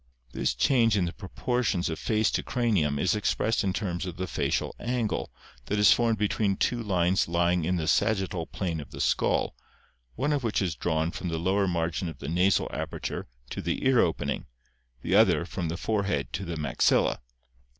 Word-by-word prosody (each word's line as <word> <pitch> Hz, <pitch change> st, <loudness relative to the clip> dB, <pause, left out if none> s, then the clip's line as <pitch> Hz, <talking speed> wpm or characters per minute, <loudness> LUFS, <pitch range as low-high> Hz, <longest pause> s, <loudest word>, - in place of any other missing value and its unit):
This -, -, -1 dB
change 115 Hz, -, +3 dB
in 90 Hz, -, +2 dB
the 85 Hz, -, -4 dB
proportions 105 Hz, -1 st, -1 dB
of 80 Hz, -, -3 dB
face 110 Hz, -2 st, +1 dB
to -, -, 0 dB
cranium 100 Hz, -13 st, +1 dB
is 90 Hz, +4 st, +2 dB
expressed 110 Hz, +1 st, 0 dB
in 95 Hz, -, +1 dB
terms 90 Hz, -2 st, -3 dB
of 90 Hz, -1 st, -6 dB
the 95 Hz, -, -2 dB
facial -, -, -1 dB
angle 120 Hz, -5 st, -1 dB, 0.4 s
that 105 Hz, -, 0 dB
is 105 Hz, -, +7 dB
formed 115 Hz, -2 st, +1 dB
between 100 Hz, -1 st, 0 dB
two 120 Hz, -1 st, 0 dB
lines 95 Hz, -3 st, +1 dB
lying 85 Hz, 0 st, +1 dB
in 90 Hz, +2 st, +1 dB
the 80 Hz, -3 st, -2 dB
sagittal 95 Hz, -6 st, +1 dB
plane 85 Hz, -5 st, -3 dB
of 75 Hz, -, -8 dB
the -, -, -10 dB
skull, -, -, +1 dB, 0.6 s
one 145 Hz, +4 st, 0 dB
of 140 Hz, -3 st, -1 dB
which 115 Hz, -3 st, 0 dB
is 90 Hz, -5 st, 0 dB
drawn 80 Hz, +1 st, -1 dB
from 90 Hz, -, -5 dB
the 80 Hz, -1 st, -2 dB
lower 95 Hz, +4 st, +1 dB
margin 85 Hz, 0 st, -1 dB
of 80 Hz, -, -9 dB
the 70 Hz, -, -6 dB
nasal 90 Hz, +4 st, +2 dB
aperture -, -, -4 dB, 0.2 s
to -, -, -4 dB
the 85 Hz, +9 st, -2 dB
ear 130 Hz, -2 st, +5 dB
opening, 80 Hz, -, 0 dB, 0.6 s
the -, -, -1 dB
other -, -, +5 dB
from 85 Hz, -, -4 dB
the 85 Hz, -, -3 dB
forehead 100 Hz, -9 st, -1 dB
to 95 Hz, -, -3 dB
the 85 Hz, -1 st, -4 dB
maxilla 75 Hz, -, +2 dB
(see -, -, -28 dB
Fig. -, -, -33 dB
95 Hz, 195 wpm, -27 LUFS, 85-110 Hz, 0.6 s, is